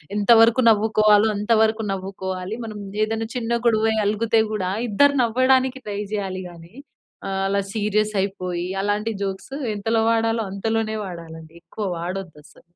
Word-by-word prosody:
ఎంతవరకు 225 +3 +5
నవ్వుకోవాలో, 215 -1 +4
అంతవరకు 220 +1 +2
నవ్వుకోవాలి. 190 +1 -5
మనం 215 -2 -7 0.3
ఏదన్న 225 +1 -3
చిన్న 235 -1 -1
గొడవై 220 -1 +2
అలుగుతే 220 +2 +2
కూడా, 185 -4 -2 0.2
ఇద్దరు 285 +7 +4
నవ్వడానికి 255 +2 +2
ట్రై 205 -1 -3
చేయాలి 190 -2 -3
గాని, 170 +1 -14 0.6
ఆహ్, 195 0 -2
అలా 200 0 0
సీరియస్ 215 0 0
అయిపోయి, 180 -3 -3 0.2
అలాంటి 210 +2 -1
జోక్స్ 195 +6 -5 0.2
ఎంతలో 225 +2 0
వాడాలో, 225 0 +1
అంతలోనే 220 +2 -1
వాడాలండి. 165 -3 -10
ఎక్కువ 215 - -6
వాడొద్దస్సలు. 170 -3 -7
210 Hz, 125 wpm, -22 LUFS, 190-225 Hz, 0.6 s, ఎంతవరకు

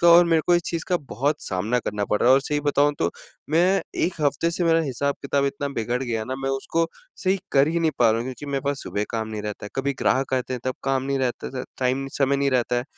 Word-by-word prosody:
का। 170 - +5
और 170 +1 +9
मेरे 165 -2 +3
को 175 - +5
इस 175 - +3
चीज़ 165 -1 -2
का 180 - +3
बहुत 145 +6 0
सामना 105 +6 0
करना 105 -3 -2
पड़ 105 - +2
रहा 120 - +4
है - - +9
और 135 - +4
सही 145 +1 -1
बताऊँ 145 0 +3
तो 85 - +1 0.4
मैं 180 +5 +3 0.2
1 180 - -1
हफ्ते 145 +3 +1
से 170 +1 -1
मेरा 165 0 +4
हिसाब-किताब 140 0 -1
इतना 140 +1 -2
बिगड़ 120 +1 -1
गया 115 -3 -2
ना, 130 - -4
मैं 135 0 -2
उसको 165 +5 0 0.3
सही 190 0 +1
कर 140 +2 +5
ही 170 +1 0
नहीं 160 -1 +3
पा 115 -2 +5
रहा 110 - +1
हूँ - - -3
क्योंकि 130 +2 -7
मेरे 135 - 0
पास 140 -1 -1
सुबह 105 - -2
काम 110 -1 -2
नहीं 105 -1 -5
रहता 105 0 -5
है, - - -10
कभी 140 +1 0
ग्राहक 130 +1 +1
आते 130 0 -2
हैं, 125 - -5
तब 130 - -1
काम 135 -1 +1
नहीं 135 0 -1
रहता 125 -2 -2
था - - -3
टाइम, 130 +1 0
समय 140 0 +3
नहीं 140 0 +1
रहता 125 -1 +1
है। 120 - -1
135 Hz, 270 wpm, -24 LUFS, 125-150 Hz, 0.4 s, और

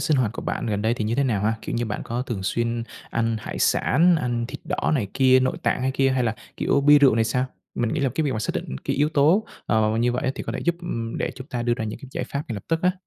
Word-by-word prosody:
sinh 150 - +2
hoạt 120 -5 +1
của - - -6
bạn - - -3
gần 105 -2 -1
đây 110 +2 +2
thì 110 - -3
như 110 - 0
thế 140 +2 +2
nào 105 -6 0
ha? 110 +1 +2
Kiểu - - -4
như, 120 0 0
bạn 105 - -3
có 120 +2 -2
thường 115 -7 -4
xuyên 115 +3 -1 0.3
ăn 115 -1 0
hải - - -6
sản, 170 +5 +4
ăn 120 -4 -1
thịt - - -7
đỏ 175 0 -1
này 120 -9 0
kia, 130 -1 +5
nội 130 - 0
tạng - - +1
hay 130 - +1
kia 135 0 +2
hay 130 -1 +1
là, 115 -1 0 0.2
kiểu, 140 - +2
bia 145 +1 +7
rượu 135 -5 +5
này 115 0 +2
sao? 125 +3 0 0.3
Mình 120 -2 0
nghĩ 155 - -1
là 135 - +2
cái 160 - 0
việc 140 - 0
mà 110 - -2
xác 110 - -1
định 65 - -4
cái - - -1
yếu 150 +2 +3
tố, 160 +8 +3 0.2
ờ, 110 -1 +3
mà 110 - 0
như 120 +1 +2
vậy 130 +2 -1
thì - - -5
có 115 - -4
thể - - -4
giúp, 170 0 +2
ừm, 115 -10 -4
để - - -1
chúng 130 0 -9
ta 120 -5 -3
đưa 120 0 +1
ra 110 - -4
những 105 - -5
cái 135 - -11
giải - - -3
pháp 140 +1 -4
ngay 115 - -3
lập 100 - -6
tức 165 0 0
á. 180 0 +4
125 Hz, 315 wpm, -24 LUFS, 115-140 Hz, 0.3 s, bia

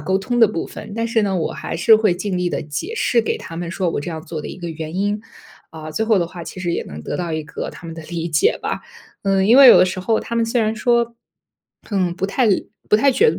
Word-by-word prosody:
沟 190 +6 0
通 240 +5 -2
的 225 - +8
部 180 -5 -3
分， - - -9
但 230 0 0
是 230 0 +2
呢， 200 -2 0
我 165 - -1
还 - - -6
是 200 +6 +6
会 215 -4 +2
尽 185 +1 -3
力 180 0 0
地 - - -2
解 155 - -5
释 240 - +2
给 - - -1
他 165 - -9
们 170 -1 -4
说 185 -1 -1
我 - - -2
这 150 - -5
样 160 -1 -5
做 160 -1 -6
的 - - -6
一 - - -8
个 175 -2 -5
原 160 0 -6
因， 205 +2 0 0.5
啊， 155 -1 -8
最 215 +8 -1
后 220 -4 +4
的 170 - 0
话 170 0 -9
其 185 - -9
实 175 -2 -1
也 - - -1
能 75 +1 -9
得 - - -4
到 175 -2 -3
一 155 0 -2
个 150 - -6
他 - - -11
们 165 - -7
的 165 - -8
理 170 +1 -4
解 155 -2 +2
吧， - - -2 0.4
嗯， 195 -1 +2
因 235 +5 +6
为 275 -2 +10
有 - - +10
的 - - +6
时 185 0 -3
候 220 +4 +1
他 235 - -6
们 230 0 +2
虽 230 +1 +1
然 220 0 +1
说， 235 +1 +1 0.8
嗯， 185 -4 0
不 195 - -1
太 240 +5 +1 0.4
不 210 - +7
太 275 +5 +4
觉 455 - +4
得 - - -5
190 Hz, 305 characters per minute, -20 LUFS, 165-225 Hz, 0.8 s, 为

